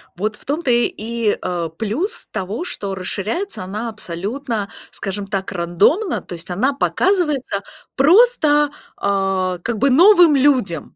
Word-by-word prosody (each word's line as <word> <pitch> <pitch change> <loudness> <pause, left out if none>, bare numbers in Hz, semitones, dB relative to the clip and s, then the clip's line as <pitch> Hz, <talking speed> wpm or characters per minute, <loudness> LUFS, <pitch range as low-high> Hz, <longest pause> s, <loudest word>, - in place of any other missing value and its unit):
Вот 215 +4 -2
в - - -17
том-то 290 -2 -1
и, 235 -2 0
а, 170 -2 -3
плюс 220 - -2
того, 200 - -4
что 200 - -4
расширяется 210 - -3
она 210 +5 -4
абсолютно, 215 +3 -4 0.2
скажем 200 0 -5
так, 195 -2 -3
рандомно, 195 - +1
то - - -10
есть 170 +1 -5
она 255 +10 +1
показывается 295 - 0 0.3
просто, 300 - +4 0.3
а, 195 -2 0
как 235 -2 -2
бы 275 - +2
новым 345 +2 +6
людям. 255 - +1
220 Hz, 130 wpm, -19 LUFS, 195-290 Hz, 0.3 s, новым